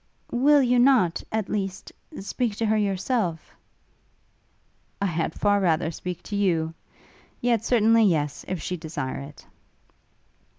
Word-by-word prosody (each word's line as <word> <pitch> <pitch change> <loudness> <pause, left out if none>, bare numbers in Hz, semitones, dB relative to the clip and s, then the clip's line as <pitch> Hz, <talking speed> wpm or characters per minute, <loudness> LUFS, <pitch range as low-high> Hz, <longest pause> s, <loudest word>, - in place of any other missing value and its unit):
'Will 280 +3 +4
you 250 0 +3
not, 240 -10 +3
at 220 -2 -1
least, 195 -3 -4 0.3
speak 220 +2 -2
to 225 - -1
her 220 0 +2
yourself?' 195 -3 -1 1.5
'I 200 - 0
had 165 -3 -1
far 205 -1 +3
rather 165 -3 +1
speak 180 +1 -6
to 205 - -5
you! 165 -5 +1 0.7
Yet 235 -3 +1
certainly 225 -1 +4
yes, 150 -6 0
if 185 - -3
she 180 +4 -4
desire 155 -5 -5
it.' 140 +1 -11
200 Hz, 130 wpm, -25 LUFS, 165-225 Hz, 1.5 s, Will